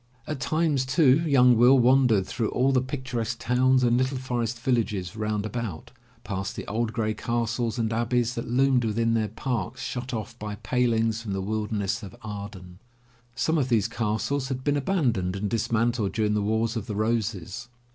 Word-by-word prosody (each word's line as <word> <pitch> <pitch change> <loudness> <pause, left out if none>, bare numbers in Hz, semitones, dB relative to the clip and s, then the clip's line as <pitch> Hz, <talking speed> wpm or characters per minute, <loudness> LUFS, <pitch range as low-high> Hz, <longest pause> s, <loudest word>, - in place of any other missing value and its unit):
At 150 -3 -4
times, 155 -1 +1
too, 130 +1 +4
young 125 -3 +6
Will 125 +4 +6
wandered 125 -5 +4
through 110 +1 -2
all 130 +2 +2
the 130 -2 +3
picturesque 125 -3 -3
towns 130 +2 +2
and 120 0 +3
little 130 +1 0
forest 120 -2 -2
villages 110 -7 -1
round 105 -1 -2
about, 110 -7 -5 0.3
past 100 +3 -4
the - - -6
old 115 +1 -1
gray 110 -2 -1
castles 115 +1 -2
and 115 -1 0
abbeys 120 +1 +1
that 115 - -5
loomed 130 +1 +3
within 115 +1 +1
their 110 -2 +1
parks 115 -2 -4
shut 125 0 -4
off 115 0 -5
by 105 -1 -5
palings 115 +1 0
from 105 -4 -4
the 95 - -2
wilderness 105 0 -2
of 100 -4 -9
Arden. 100 -4 -8 0.6
Some 160 +5 +1
of 130 -2 0
these 110 -5 +2
castles 115 +5 -1
had 130 -1 -4
been 145 +1 +1
abandoned 125 - 0
and 100 +1 -2
dismantled 115 0 0
during 105 -1 +1
the 105 - +1
Wars 110 +3 0
of 110 -3 -4
the 105 - -4
Roses. 110 0 -2
115 Hz, 175 wpm, -26 LUFS, 105-125 Hz, 0.6 s, young